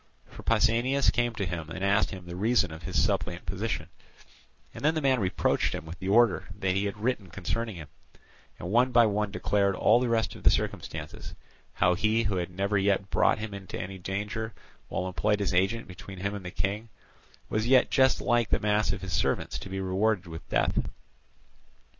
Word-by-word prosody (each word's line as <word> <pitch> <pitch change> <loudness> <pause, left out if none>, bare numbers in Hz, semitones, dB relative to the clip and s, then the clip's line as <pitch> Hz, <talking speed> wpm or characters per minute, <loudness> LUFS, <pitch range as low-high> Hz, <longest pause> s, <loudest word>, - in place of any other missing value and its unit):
For - - -12
Pausanias 115 +5 +3
came 120 -2 0
to 100 - -2
him 85 -3 -4
and 95 +4 -3
asked 100 +2 +3
him 95 -2 -8
the 85 0 -7
reason 105 -2 +2
of 80 +1 -9
his - - -1
suppliant - - 0
position; - - -3 0.9
and 115 - -9
the 155 +1 +3
man 135 -3 +2
reproached 95 -3 +1
him - - -6
with 80 +3 -9
the 95 - -5
order 115 +4 +4
that 95 -2 0
he 100 +2 0
had 100 +1 -3
written 105 -4 -2
concerning 100 +5 -3
him, 80 -4 -8 0.7
and 90 - -6
one 125 +3 +4
by 120 -1 +6
one 105 0 0
declared 100 -1 +1
all 110 +5 +4
the 125 -1 0
rest 115 -1 +1
of - - -11
the - - +6
circumstances, - - -3 0.4
how 90 0 +3
he 110 +5 +2
who 100 -3 0
had 90 0 -2
never 100 +3 0
yet 100 0 +1
brought - - +3
him 110 -1 -5
into 100 -1 -7
any 95 +1 -6
danger, 105 +4 -4 0.3
while 90 - -3
employed 105 +3 0
as 100 -2 -1
agent 95 +6 +1
between 95 +1 -10
him 100 +2 -2
and 100 -2 -6
the - - -4
King, 100 +6 -2 0.6
was 110 +2 -1
yet 130 0 +5
just 130 -1 +4
like 120 -2 +2
the - - +2
mass 105 0 +2
of - - -4
his 95 - -4
servants - - 0
to - - -8
be 95 0 -4
rewarded 95 +1 0
with 80 -2 -9
death. - - +1
100 Hz, 200 wpm, -28 LUFS, 95-115 Hz, 0.9 s, by